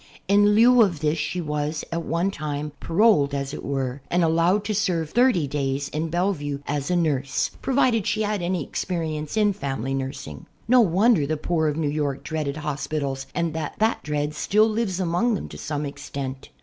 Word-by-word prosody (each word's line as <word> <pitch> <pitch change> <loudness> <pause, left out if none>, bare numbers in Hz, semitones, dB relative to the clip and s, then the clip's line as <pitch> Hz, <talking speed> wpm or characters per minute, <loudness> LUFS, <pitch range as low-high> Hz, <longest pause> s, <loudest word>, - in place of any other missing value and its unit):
In 205 +1 +5
lieu 240 +2 +6
of 185 -8 +2
this 155 +1 +1
she 180 +4 -2
was, 150 0 -2
at 165 0 -2
one 170 +5 0
time', 150 -3 -4
paroled, 165 -7 +3
as 140 0 -3
it - - -6
were, 135 -1 -2
and 175 0 +2
allowed 170 +5 +3
to 215 - -1
serve 170 -6 0
thirty 240 - +3
days 140 0 -2
in 160 +2 -2
Bellevue 165 -5 -1
as 145 +1 -2
a 180 - +2
nurse, 145 -6 0
provided 250 -5 +2
she 215 +1 +1
had 210 - 0
had 205 -3 -1
any 175 -2 -1
experience 160 0 -3
in 210 -1 +3
family 135 -5 -3
nursing. 130 - -5 0.2
No 250 +1 +6
wonder 195 -4 +3
the 155 +1 -1
poor 160 +1 0
of 150 0 -1
New 160 -2 0
York 145 -2 -2
dreaded 155 -3 -3
hos 150 -2 -3
pitals 135 -3 -3
and 170 -2 0
that 160 -2 -4
that 220 +1 +1
dread 150 0 -2
still 210 +8 +3
lives 215 -4 -1
among 185 +6 +1
them - - -5
to - - -9
some 150 -1 -3
extent. 135 -1 -6
160 Hz, 195 wpm, -24 LUFS, 145-195 Hz, 0.2 s, lieu